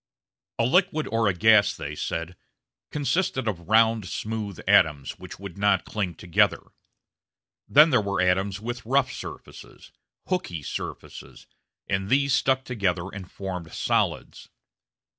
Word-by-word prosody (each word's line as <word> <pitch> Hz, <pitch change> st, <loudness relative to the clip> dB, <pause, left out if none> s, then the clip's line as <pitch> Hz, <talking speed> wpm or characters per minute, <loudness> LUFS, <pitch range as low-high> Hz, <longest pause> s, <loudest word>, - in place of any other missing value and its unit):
A 115 Hz, -, +2 dB
liquid 175 Hz, +2 st, +2 dB
or 115 Hz, -1 st, +2 dB
a 100 Hz, -, +2 dB
gas, 105 Hz, +1 st, +5 dB
they 75 Hz, 0 st, -5 dB
said, 85 Hz, +3 st, -4 dB, 0.5 s
consisted 145 Hz, -3 st, -1 dB
of 90 Hz, -4 st, -4 dB
round, 110 Hz, -2 st, +4 dB
smooth 105 Hz, -2 st, -4 dB
atoms, 70 Hz, -3 st, +3 dB
which -, -, -10 dB
would 100 Hz, -1 st, -9 dB
not 100 Hz, -2 st, +2 dB
cling 95 Hz, -6 st, -3 dB
together. 85 Hz, +1 st, +1 dB, 1.0 s
Then 150 Hz, +3 st, +6 dB
there 120 Hz, -, +4 dB
were 100 Hz, -1 st, -2 dB
atoms 95 Hz, +2 st, +1 dB
with 120 Hz, +2 st, -5 dB
rough 130 Hz, +2 st, +1 dB
surfaces, -, -, -10 dB, 0.4 s
"hooky" 90 Hz, -, -3 dB
surfaces, -, -, -7 dB, 0.4 s
and 95 Hz, 0 st, -1 dB
these 140 Hz, +1 st, +3 dB
stuck 130 Hz, -1 st, +2 dB
together 95 Hz, -6 st, -1 dB
and 95 Hz, -3 st, -8 dB
formed 90 Hz, -4 st, -6 dB
solids. -, -, -1 dB
105 Hz, 130 wpm, -25 LUFS, 90-125 Hz, 1.0 s, Then